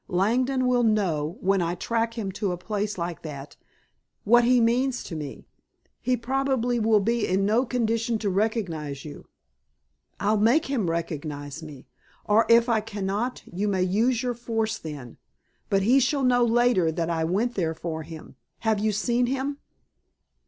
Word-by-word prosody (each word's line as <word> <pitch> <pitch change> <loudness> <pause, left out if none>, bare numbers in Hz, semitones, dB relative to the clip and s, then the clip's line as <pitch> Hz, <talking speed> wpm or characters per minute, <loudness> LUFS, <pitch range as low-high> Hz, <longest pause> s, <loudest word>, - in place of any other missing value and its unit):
Langdon 250 +8 +1
will 250 -1 +3
know, 180 -8 0
when 195 0 +2
I 170 +1 -1
track 230 +4 -1
him 205 -5 -3
to 195 0 -2
a 180 - -3
place 210 +2 -3
like 170 -1 -4
that, 145 -3 -8 0.7
what 240 +3 +5
he 250 +1 +4
means 245 +2 +1
to 165 - -7
me." 150 -3 -7 0.6
"He 255 0 +1
probably 250 0 0
will 220 -1 +4
be 230 +2 0
in 190 +2 +1
no 230 +5 +2
condition 230 -1 0
to 210 -2 -2
recognize 180 - -2
you." 150 - -10 0.9
"I'll 210 +2 +2
make 240 +10 +3
him 240 -10 -1
recognize 155 -3 -4
me. 150 -4 -11 0.4
Or 210 +2 +3
if 230 +1 +6
I 225 -3 +2
cannot 210 +3 -3
you 195 +4 -3
may 190 -3 +1
use 225 +7 +1
your 250 -1 0
force 225 -2 -2
then, 145 -6 -8 0.5
but 195 -1 +2
he 250 +7 +5
shall 275 +1 +1
know 245 -1 +4
later 235 -7 +3
that 165 +1 -2
I 165 -1 0
went 205 +9 0
there 165 -6 -1
for 160 -1 -4
him. 160 0 -11 0.2
Have 220 -2 +1
you 215 +1 +1
seen 240 +4 +1
him?" 275 +2 -2
215 Hz, 165 wpm, -25 LUFS, 175-240 Hz, 0.9 s, if